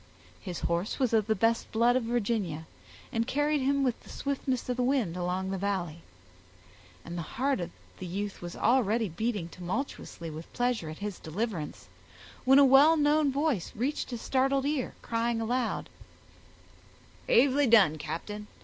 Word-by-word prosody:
His 175 -2 -6
horse 170 +5 -1
was 255 -4 +1
of 220 -2 +3
the 220 - +2
best 225 +3 +1
blood 235 +2 +3
of 255 - +2
Virginia, 215 -9 -1 0.5
and 230 -2 0
carried 295 +1 +1
him 275 +1 +2
with 250 -3 0
the - - -17
swiftness 270 -2 -2
of 250 - -1
the - - +1
wind 245 -9 +1
along 180 +1 -2
the 195 - -2
Valley; 175 -5 -2 1.0
and 170 - -6
the 170 - -3 0.2
heart 270 0 +1
of 175 -1 -3 0.3
the 185 - -5
youth 200 +3 -4
was 175 0 -6
already 230 -3 +2
beating 205 +1 -2
tumultuously 175 - -5
with 160 +2 -9
pleasure 245 -9 0
at 155 - -7
his 205 -3 -5
deliverance, 170 -2 -4 0.6
when 265 +1 +7
a 280 - +8
well 280 +5 +7
known 295 -1 +3
voice 275 - 0
reached 265 +7 -2
his 240 -3 -5
startled 270 +1 +1
ear, 285 -3 -1
crying 230 0 0
aloud,— 240 +2 -1 1.4
"Bravely 285 - +4
done, 195 -10 +5
captain! 205 +8 -5
230 Hz, 160 wpm, -29 LUFS, 185-265 Hz, 1.4 s, a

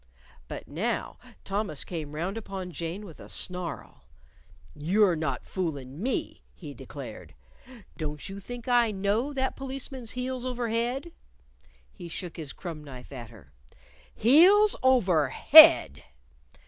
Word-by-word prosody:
But - - -8
now - - -3 0.2
Thomas 195 -7 -2
came 155 -4 -6
round 175 +6 -3
upon 195 -4 -6
Jane 170 +6 -5
with 165 -6 -12
a - - -12
snarl. 180 -2 -5 0.7
"You're 180 +5 +2
not 155 0 -3
foolin' 145 -5 -4
me," 255 +2 -2
he 150 -5 -9
declared. 125 - -10 0.6
"Don't 150 -2 -5
you 195 0 -7
think 240 +4 -9
I 240 -2 +4
know 210 +7 -1
that 265 -2 -2
policeman's 265 -3 -7
heels 250 0 -4
over 245 -2 -3
head?" 245 +8 -2 0.8
He 170 - -10
shook 175 +1 -6
his 155 -4 -5
crumb 165 -4 -8
knife 130 -3 -11
at 120 -4 -8
her. 110 - -17 0.7
"_Heels 370 - +6
over 185 - +3
head! 130 - +8
190 Hz, 130 wpm, -27 LUFS, 150-245 Hz, 0.8 s, head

